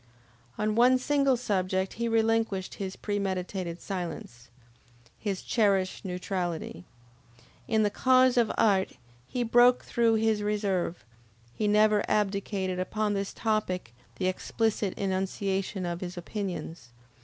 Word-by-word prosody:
On 215 0 0
one 245 +3 +5
single 275 0 +2
subject 190 -4 -1
he 235 +1 -2
relinquished 225 -4 +1
his 190 -1 -5
premeditated 190 -3 -3
silence, 170 - -6 0.7
his 200 -3 -3
cherished 195 -5 +1
neutrality. 180 - -4 0.8
In 220 -1 +2
the 205 - +1
cause 255 +1 +4
of 235 -3 +3
art 195 -3 +3 0.3
he 245 - -2
broke 245 +2 +5
through 230 -2 +2
his 220 -1 +1
reserve, 200 - -1 0.5
he 210 - -1
never 210 0 +4
abdicated 195 -2 0
upon 210 +3 -1
this 195 -1 -2
topic 200 - -2 0.2
the 185 - -3
explicit 205 +2 -1
enunciation 190 0 -2
of 175 0 -4
his 180 -1 -6
opinions. 175 - -5
200 Hz, 120 wpm, -28 LUFS, 185-220 Hz, 0.8 s, one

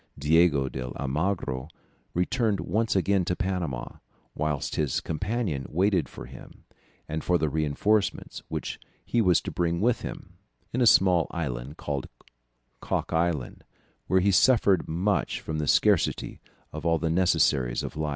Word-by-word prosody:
Diego 75 -1 +3
de 65 - -5 0.2
Almagro 70 -2 -2 0.5
returned 105 +3 +1
once 110 0 0
again 95 0 +2
to 90 +1 -1
Panama, 90 -11 -3 0.4
whilst 75 +1 -2
his 75 -3 0
companion 80 - -2
waited 90 -1 +1
for - - -9
him - - -13 0.4
and 80 0 -4
for 90 - +2
the 80 -2 0
reinforcements 80 +8 0
which - - -4 0.3
he 120 - +1
was 90 -5 +4
to - - -5
bring 85 -1 0
with 120 +4 +1
him, - - -8 0.3
in 125 - 0
a 120 - +5
small 90 -5 +5
island 70 -3 -4
called 70 -3 -4 0.7
Cock - - -2
Island, 80 -5 -1 0.4
where 95 0 +3
he 100 +2 +3
suffered 100 -4 +4
much 95 +6 0
from 80 -1 -4
the 75 - -2
scarcity - - +2 0.3
of - - -6
all 85 0 +2
the 80 0 -1
necessaries 70 -8 +2
of - - -6
life." 75 0 -2
85 Hz, 150 wpm, -27 LUFS, 75-95 Hz, 0.7 s, a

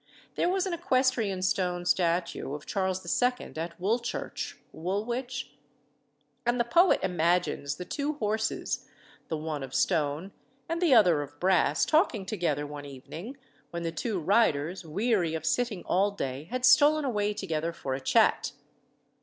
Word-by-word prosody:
There - - +1
was 380 +1 +1
an 375 - -2
equestrian 255 - +1
stone 180 -2 0
statue 170 -5 0
of 150 - -9
Charles 190 -1 -1 0.2
II. 250 0 0
at 165 +2 -5
Woolchurch 230 +6 -2 0.2
(Woolwich?), 240 +9 -3 0.9
and 240 0 +1
the - - +4
poet 340 +10 +4
imagines 170 -5 +1
the 180 - -7
two 290 +9 -2
horses, 220 -5 -2 0.4
the 160 - -2
one 155 -1 -4
of 135 -1 -6
stone 160 +2 0 0.4
and 335 +1 -2
the 325 -8 +5
other 180 -9 +5
of 145 0 -9
brass, 185 0 +3
talking 305 - +2
together 170 -8 -1
one 145 0 -8
evening, 160 - -9 0.3
when 170 0 -5
the 165 - -1
two 190 +5 -2
riders, 180 -2 +2
weary 180 0 0
of 160 -1 -4
sitting 230 -2 0
all 195 +3 +2
day, 140 -8 -4
had 250 +7 -1
stolen 295 +3 +6
away 210 -5 0
together 165 -5 -2
for 140 -5 -4
a 135 - -3
chat. - - +3
190 Hz, 150 wpm, -28 LUFS, 160-240 Hz, 0.9 s, stolen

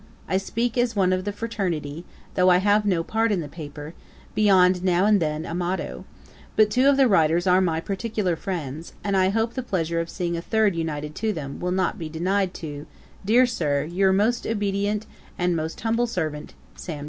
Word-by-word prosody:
I 190 - +1
speak 230 +5 -1
as 245 -2 +1
one 185 -2 +3
of 185 +1 -2
the 205 - -1
fraternity, 180 -8 -3 0.3
though 185 0 +4
I 180 - +6
have 205 +2 +2
no 175 -4 +1
part 225 +4 0
in 200 - +1
the 155 - -4
paper, 150 0 -9 0.4
beyond 185 -3 +4
now 180 0 +3
and 210 -1 +4
then 155 -1 -2
a 165 - -5
motto; 180 +2 -3 0.5
but 215 -1 +4
two 255 +5 +4
of 280 - +4
the 270 -2 +5
writers 170 -3 +3
are 185 0 +4
my 165 -3 +1
particular 195 0 -2
friends, 160 -4 -5
and 200 -1 0
I 190 0 +3
hope 225 +3 0
the 260 - -3
pleasure 170 -8 -1
of 165 0 -3
seeing 170 -1 -2
a 170 - -3
third 215 0 +1
united 150 -2 -3
to 220 -1 0
them, 140 -5 -6
will 180 - -2
not 185 0 0
be 160 -2 -5
denied 185 +4 0
to, 145 -1 -7 0.4
dear 235 +6 +5
Sir, 150 - 0
'Your 185 +5 +1
most 215 +5 +1
obedient, 205 0 -1 0.3
'And 180 -1 +1
most 160 0 -3
humble 230 +2 +1
servant, 155 -9 -4 0.2
'SAM. 155 -4 -6
185 Hz, 200 wpm, -24 LUFS, 165-210 Hz, 0.5 s, I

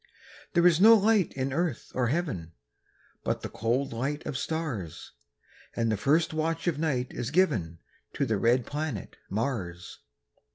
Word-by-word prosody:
There 170 -1 +4
is 175 -1 +5
no 225 +2 +9
light 210 -3 +3
in 130 0 -2
earth 165 -4 -2
or 125 -2 +1
heaven, 120 - -2 0.7
But - - -1
the - - -4
cold 120 +5 -1
light 140 +6 -3
of 145 - -4
stars; 135 - -4 0.6
And 115 -1 +1
the - - +2
first 155 - +2
watch 160 +1 -1
of 165 -5 0
night 135 -6 -1
is 120 - -3
given 110 - +1 0.4
To 140 - 0
the 110 -4 0
red 120 +2 +3
planet 145 - -4
Mars. 95 -6 -3
140 Hz, 155 wpm, -28 LUFS, 115-165 Hz, 0.7 s, no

